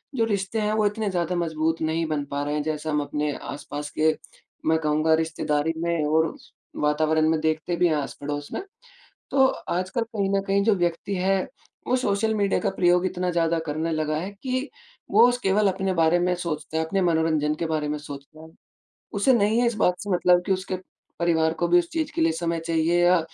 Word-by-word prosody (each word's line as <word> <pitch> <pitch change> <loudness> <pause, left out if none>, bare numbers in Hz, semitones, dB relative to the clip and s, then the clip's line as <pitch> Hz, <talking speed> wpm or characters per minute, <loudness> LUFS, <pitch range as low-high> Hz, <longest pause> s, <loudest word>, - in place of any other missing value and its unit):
जो 230 -3 +2
रिश्ते 205 0 -1
हैं, 210 0 0
वो 215 -1 +2
इतने 210 0 0
ज़्यादा 180 -1 -1
मजबूत 160 -1 -1
नहीं 160 +1 0
बन 150 -2 -1
पा 140 0 -1
रहे 145 +1 -2
हैं। 150 - -1
जैसे 155 0 -3
हम 150 -1 +1
अपने 150 +1 -2
आस-पास 145 0 -6
के 155 - +5 0.6
मैं 160 - +4
कहूँगा 155 +1 +2
रिश्तेदारी 160 -1 -1
में 170 -2 0
और 160 +1 +1 0.5
वातावरण 155 +1 +2
में 160 -1 +2
देखते 160 +2 0
भी 175 +1 +3
हैं, 155 - +1
आस-पड़ोस 145 0 -4
में। - - -2 0.7
तो 270 -1 +5
आजकल 185 +1 -2
कहीं 215 -4 -2
न - - +1
कहीं 200 0 +2
जो 220 0 +3
व्यक्ति 175 +2 -1
है, 190 +1 +2 0.5
वो 250 - +3
सोशल 220 -2 0
मीडिया 200 -2 +1
का 205 - +1
प्रयोग 180 -1 +3
इतना 180 -1 -1
ज़्यादा 165 -1 +1
करने 155 +3 -2
लगा 155 -1 -1
है 185 +5 -4
कि 255 +2 -2 0.4
वो 240 - +7
उस 245 - 0
केवल 205 +1 +3
अपने 190 0 -1
बारे 165 0 +3
में 180 +1 +1
सोचते 160 -3 -4
हैं, 160 - +1
अपने 195 +4 0
मनोरंजन 160 -3 +1
के 165 - -3
बारे 155 -2 -1
में 150 - -1
सोचते 145 +1 -10
हैं, 160 0 -12 0.6
उसे 205 +6 +3
नहीं 220 0 +3
है - - +3
इस 235 - -1
बात 180 -4 +1
से 205 - -6
मतलब 180 0 +4
कि 195 - -1
उसके 185 0 -3 0.4
परिवार 160 -2 +2
को 175 - +3
भी 175 +1 +5
उस 170 - -3
चीज़ 320 -2 -2
के - - 0
लिए 165 0 +4
समय 165 0 -2
चाहिए 165 +1 +2
या 180 0 +5
170 Hz, 210 wpm, -25 LUFS, 155-195 Hz, 0.7 s, वो